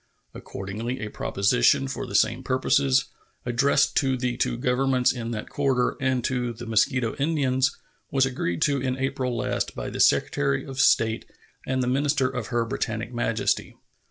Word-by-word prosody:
Accordingly, 110 +7 -5
a 110 - -4
proposition 125 +7 +2
for 135 - -5
the - - -6
same 115 +3 +2
purposes, 135 +1 +2 0.4
addressed 135 +4 +2
to 135 -2 +2
the 125 -1 -1
two 120 - -1
Governments 125 +1 +2
in 120 -2 -5
that 110 -2 -4
quarter 135 -3 +1
and 130 -2 +1
to 125 -1 -1
the 120 +2 -9
Mosquito 115 +2 +1
Indians, 135 -3 +1 0.3
was 135 -3 +3
agreed 105 -10 -2
to 140 -2 +1
in 130 0 -1
April 130 -2 -2
last - - -2
by - - -5
the - - -6
Secretary 70 -1 +2
of 135 -1 -7
State 115 -4 +3 0.4
and 130 -1 0
the - - -1
minister 140 +1 +1
of 125 -4 -4
Her 120 -2 0
Britannic 115 +1 -3
Majesty. 115 -2 -1
125 Hz, 160 wpm, -25 LUFS, 115-135 Hz, 0.4 s, was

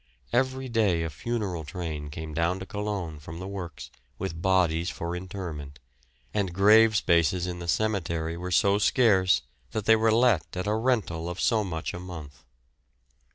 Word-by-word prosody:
Every 130 +1 +1
day 105 -8 +2
a 80 - -3
funeral 100 -1 -3
train 80 -3 -5
came 80 +1 -7
down 85 +4 +1
to 95 - -7
Colon 100 -7 -4
from 80 +2 -9
the 95 +2 -6
works 90 -6 -7 0.3
with 85 -4 -4
bodies 90 -2 +2
for 85 -1 -4
interment, 90 -6 -6 0.6
and 100 -4 0
grave 110 +3 +6
spaces 85 0 +2
in 90 -1 -4
the 85 - -6
cemetery 85 -5 0
were 90 +2 -5
so 100 +3 +3
scarce 95 - +4 0.3
that 110 - -2
they 110 - +7
were 110 0 +3
let 115 -7 +2
at 90 - -2
a 105 - +1
rental 110 -8 0
of 90 - -6
so 110 -3 +2
much 80 -5 -4
a - - -5
month. 80 -7 -9
90 Hz, 165 wpm, -27 LUFS, 85-105 Hz, 0.6 s, they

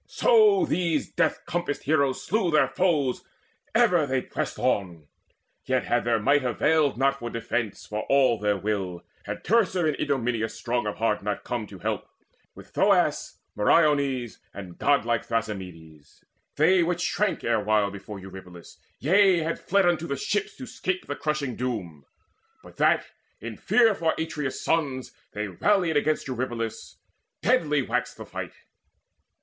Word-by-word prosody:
So 430 -6 +4
these 170 - -1
death 165 -2 0
compassed 175 -3 -3
heroes 140 -3 +1
slew 200 -3 0
their 155 -2 +3
foes 155 -9 0 0.5
Ever 180 - +5
as 150 -4 0
they 130 -1 0
pressed - - -4
on. 85 -6 -1 0.6
Yet 130 0 +1
had 120 -1 0
their 120 -1 +2
might 140 +6 +3
Availed 145 +3 +2
not 135 +1 +1
for 120 - -5
defence, 115 -2 -3
for 105 0 -4
all 130 -4 +4
their 105 -1 +1
will, 95 -3 -3 0.2
Had - - -6
Teucer 190 -6 +2
and 155 -2 +1
Idomeneus 125 -6 -1
strong 120 -2 -2
of 105 - -3
heart 110 -3 0 0.2
Come 120 - -2
not 105 - -9
to 100 - -10
help, - - -3 0.5
with - - -13
Thoas, - - +2 0.2
Meriones, 135 0 +2 0.2
And 90 -3 -9
godlike 120 -5 +2
Thrasymedes, 90 -9 -6 0.3
they 180 +5 +4
which 175 +1 0
shrank 210 -2 0
Erewhile 105 -3 +1
before 100 +1 -8
Eurypylus 95 -2 -11 0.2
yea, 185 +2 +4
had 165 +1 -2
fled 200 0 +2
Unto 170 -1 +1
the 140 - -2
ships 205 +8 -2
to 260 - -7
'scape 185 -6 -3
the 145 - -4
crushing 150 -5 -2
doom, 95 - -5 0.6
But - - -15
that, - - +3 0.3
in - - -7
fear 230 -3 +3
for 165 -4 0
Atreus' 150 -4 -3
sons, 140 -6 -1 0.2
they 105 0 -3
rallied 175 - +1
Against 150 +1 +1
Eurypylus: 120 -3 -4 0.5
deadly 155 - +2
waxed - - -2
the - - -8
fight. - - -6
135 Hz, 150 wpm, -26 LUFS, 110-165 Hz, 0.6 s, Ever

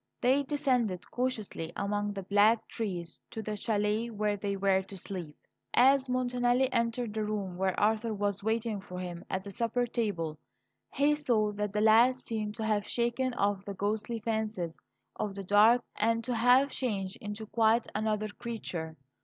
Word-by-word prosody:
They 260 +3 +3
descended 255 - 0
cautiously 220 -10 -2
among 205 0 -1
the 195 -1 -5
black 205 +4 +3
trees 180 -7 -4
to 220 - -6
the 215 0 -3
chalet 210 +2 0
where 210 -2 0
they 200 0 -3
were 195 -1 +3
to 195 +1 -8
sleep. 175 -5 -6 0.4
As 265 +1 +5
Montanelli 250 0 +2
entered 230 -1 0
the 215 0 -1
room 205 -4 -3
where 190 0 0
Arthur 220 +2 +2
was 200 -1 -1
waiting 220 -1 -1
for 180 -2 -9
him 175 -2 -5
at 190 0 -2
the 200 - -8
supper 235 +4 0
table, 195 -10 -2 0.5
he 285 +2 +3
saw 240 -8 +1
that 210 0 -3
the 210 - +1
lad 225 +4 +6
seemed 215 -4 -4
to 220 - -3
have 210 -1 0
shaken 240 +1 0
off 200 -1 0
the 200 0 -6
ghostly 215 +4 -2
fancies 215 -6 -2 0.4
of 200 -2 -3
the 200 - -5
dark, 215 +5 +5
and 230 +1 +1
to 250 - -2
have 250 +4 +4
changed 195 -7 -2
into 210 +1 -5
quite 225 +1 +2
another 215 0 -1
creature. 185 -8 -5
215 Hz, 170 wpm, -30 LUFS, 200-235 Hz, 0.5 s, lad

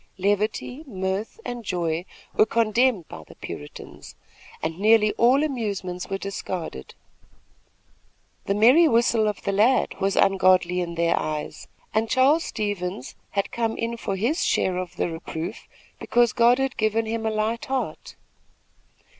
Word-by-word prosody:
Levity, 210 +8 -1
mirth 190 - -3
and 240 -1 -5
joy 175 -3 -2 0.3
were 215 - +4
condemned 230 -3 +2
by 80 - -10
the - - -14
Puritans, 75 - -9 0.5
and 160 +2 -3
nearly 215 0 +5
all 255 +5 +4
amusements 200 -10 -3
were 195 - -1
discarded. 185 - -6 1.5
The 200 - 0
merry 255 +11 +6
whistle 230 -3 +3
of 210 -2 -3
the - - 0
lad 220 +6 +3
was 195 0 +1
ungodly 185 -2 +3
in 170 -1 -4
their 170 0 +2
eyes, 155 -1 -5 0.3
and 220 +1 +1
Charles 275 +6 +3
Stevens 185 - -4 0.2
had 200 - 0
come 230 -1 -1
in 230 +1 -2
for 215 -4 -3
his 240 - 0
share 185 -1 +1
of 180 -1 -5
the - - -1
reproof 165 0 -6 0.3
because 240 -2 +2
God 240 +1 +5
had 270 -1 -2
given 220 +1 +1
him 225 0 -3
a 220 - +1
light 220 +2 -1
heart. 265 -1 -4
210 Hz, 145 wpm, -24 LUFS, 185-235 Hz, 1.5 s, merry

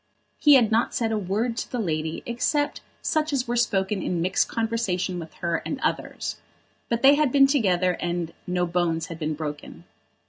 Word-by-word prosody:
He 295 -2 +7
had 235 -4 +4
not 225 +2 +1
said 225 -2 0
a 220 - +1
word 210 +5 -1
to - - -4
the 250 - -2
lady, 160 -6 -2
except 290 +5 -1 0.2
such 310 0 0
as 260 -3 0
were 240 - -1
spoken 200 -4 +1
in 175 -1 -1
mixed 185 +3 +1
conversation 220 -6 -1
with 165 -1 -8
her 170 -2 -1
and 280 - -4
others; - - -2 0.5
but 235 +1 -1
they 275 +1 +8
had 295 -2 +2
been 275 0 +6
together, 190 -10 +2
and 175 -1 -2
no 180 0 0
bones 170 -2 0
had 165 -1 -7
been 155 -1 -2
broken. 150 -1 -7
195 Hz, 185 wpm, -25 LUFS, 175-240 Hz, 0.5 s, they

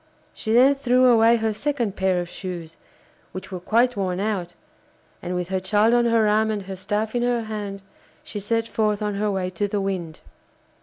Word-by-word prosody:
She 220 - -4
then 255 +4 +6
threw 255 -2 +2
away 230 -1 +6
her 220 -1 0
second 240 -4 -2
pair 190 -2 +1
of 175 - -4
shoes, 170 -3 -7 0.6
which 190 +1 -8
were 185 - -4
quite 235 +7 +2
worn 185 -2 -2
out, 195 -4 -2 0.7
and 180 0 -4
with 180 0 -3
her 190 0 0
child 210 +4 +2
on 240 0 +4
her 230 -2 +3
arm 215 +1 +2
and 210 -2 -2
her 190 0 -7
staff 210 +3 -2
in 240 - 0
her 240 -1 0
hand, 205 -3 -6 0.4
she 210 - -6
set 225 +3 -1
forth 215 -2 0
on 210 -1 -1
her 210 +1 -1
way 190 -2 -2
to 195 +3 -1
the 205 +1 -2
Wind. 185 -5 -3
210 Hz, 200 wpm, -23 LUFS, 190-230 Hz, 0.7 s, then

